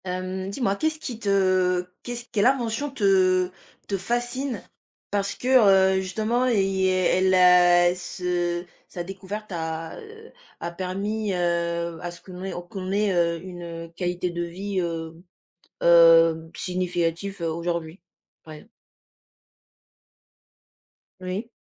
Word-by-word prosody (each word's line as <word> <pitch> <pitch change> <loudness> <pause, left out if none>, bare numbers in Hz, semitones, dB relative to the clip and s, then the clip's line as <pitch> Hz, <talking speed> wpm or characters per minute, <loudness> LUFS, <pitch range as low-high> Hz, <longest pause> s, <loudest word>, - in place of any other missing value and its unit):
Hem, 185 +1 -4
dis-moi 200 -1 0
qu'est-ce 315 +3 0
qui 245 -7 -6
te, 185 -3 +2 0.2
qu'est-ce 240 0 -5
quelle 210 +2 +3
invention 260 +1 0
te 185 -6 +2 0.4
te 200 - -1
fascine, 240 +2 -2 0.5
parce 200 -1 -1
que, 250 - -6 0.5
heu, - - +1
justement, 220 +6 0
il 195 -5 +1
est 185 -1 +2
elle 190 0 +3
a 175 -1 +6
ce 175 -1 -2 0.2
sa 175 - -6
découverte 195 +3 -7
a, 160 -1 -4
heu, 440 +1 -13 0.3
a 170 - -4
permis, 195 +4 -3
heu, 170 -1 -1
à 175 - -4
ce 175 - -12
qu'on 185 -1 -10
ait 190 - -4 0.2
qu'on 190 -1 -5
ait, 205 0 +1
heu, 170 -1 +1
une, 180 -2 -8
heu, 165 -1 -7
qualité 180 0 -2
de 175 0 -4
vie, 190 +3 -4
heu, 165 -1 -5 0.6
heu, 165 -1 +6
significative, 180 +1 -2
heu, 165 - -1
aujourd'hui? 170 +1 -4 0.4
Ouais. 155 +7 -12 2.5
Oui. 185 +5 -5
185 Hz, 130 wpm, -24 LUFS, 170-200 Hz, 2.5 s, a